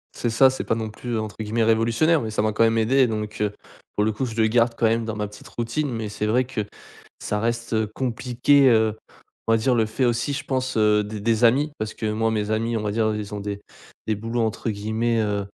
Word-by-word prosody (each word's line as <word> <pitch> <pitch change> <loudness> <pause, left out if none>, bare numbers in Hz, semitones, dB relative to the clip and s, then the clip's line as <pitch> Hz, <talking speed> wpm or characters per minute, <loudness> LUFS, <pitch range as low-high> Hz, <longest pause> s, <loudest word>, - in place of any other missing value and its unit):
C'est 120 - -1
ça, 130 +4 +5
c'est 130 - -4
pas 115 - 0
non 110 -1 -3
plus 115 +2 -4
entre 110 -1 -5
guillemets 110 +2 0
révolutionnaire 115 +8 +3
mais 110 -1 -4
ça 105 - 0
m'a 110 0 +1
quand 115 - +3
même 115 0 +3
aidé 125 +3 +3
donc, 105 -1 -4
heu, 105 -1 0 0.4
pour 105 - +2
le 110 - +2
coup 130 +5 -2
je 115 -2 -6
le 110 -1 +3
garde 115 +1 +2
quand 115 - +1
même 115 0 +1
dans 110 -1 -4
ma 105 -1 -2
petite 105 0 -13
routine. 120 +5 -2
Mais 110 -2 -4
c'est 105 0 -3
vrai 125 +4 +2
que 125 -4 -3 0.6
ça 105 - -2
reste, 115 +1 -2
heu, 110 -1 +1
compliqué, 130 +2 +2
heu, 110 -2 +3 0.5
on 115 - +4
va - - +4
dire 125 +2 +2
le 110 -1 +3
fait 115 +4 -1
aussi 120 +4 0
je 140 - -3
pense, 130 -2 -2
heu, 105 -1 +4
des 105 0 -6
des 115 +1 +1
amis 140 +6 +4
parce 110 0 -3
que 110 -1 -3
moi 110 +1 0
mes 105 -1 -1
amis 115 +1 0
on - - -2
va 105 - -1
dire 110 0 +1
ils 105 0 -5
ont 105 - -3
des 100 0 -5 0.5
des 110 - +1
boulots 115 +3 -2
entre 110 +1 -1
guillemets, 110 +2 0
heu, 100 -1 -1
115 Hz, 255 wpm, -23 LUFS, 110-120 Hz, 0.6 s, ça